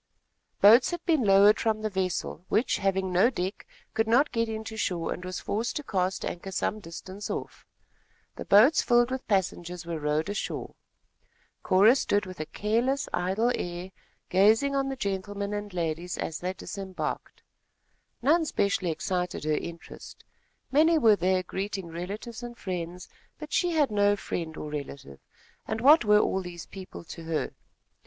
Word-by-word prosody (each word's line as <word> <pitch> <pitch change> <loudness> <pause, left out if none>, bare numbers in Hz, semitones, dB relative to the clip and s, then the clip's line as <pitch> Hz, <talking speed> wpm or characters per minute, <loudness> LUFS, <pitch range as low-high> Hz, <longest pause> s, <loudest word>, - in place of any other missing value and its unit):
Boats 225 +5 +7
had 345 -1 -5
been 320 -5 +3
lowered 200 +1 +6
from 220 -1 0
the 215 - 0
vessel, 185 -3 -2
which, 220 +5 +2
having 190 -1 0
no 190 +7 +5
deck, 190 -5 -4 0.3
could 225 0 +1
not 250 +6 +4
get 230 -1 0
into 220 0 -5
shore 175 -6 -1
and 180 - -9
was 185 0 -4
forced 225 +3 -2
to 295 - -3
cast 190 -6 -1
anchor 185 +3 -5
some 200 +3 -1
distance 190 +2 -8
off. - - -6 0.7
The - - -7
boats, 240 +10 +6
filled 240 0 +3
with 260 0 -4
passengers, 180 -3 -1
were 165 -2 -4
rowed 150 +1 0
ashore. 205 0 -4 0.9
Cora 200 +6 +5
stood 205 -7 +1
with 185 -2 -9
a 155 - -4
careless, 235 - 0
idle 190 +7 +1
air 175 +1 -5 0.4
gazing 220 +9 +4
on 270 0 0
the 270 - -3
gentlemen 200 -1 -3
and 205 0 -4
ladies 170 0 -3
as 160 - -4
they 180 +1 -3
disembarked. 190 0 -6 0.8
None 320 +6 +4
specially 200 -6 0
excited 180 +2 -2
her 155 - 0
interest. 165 +2 -6 0.5
Many 320 +4 +5
were 225 -8 +6
there 185 0 +1
greeting 195 -1 -4
relatives 205 +7 -6
and 240 -1 -8
friends; 180 -1 -5 0.3
but 305 -1 -9
she 355 - +2
had 295 -6 +2
no 205 0 +3
friend 165 -5 -5
or 150 - -6
relative, 140 - -7 0.5
and 220 - -2
what 290 +6 +7
were 210 -1 +5
all 190 -2 +1
those 175 -2 -8
people 190 -3 -10
to 165 0 -10
her? 160 -1 -2
195 Hz, 160 wpm, -27 LUFS, 180-225 Hz, 0.9 s, Boats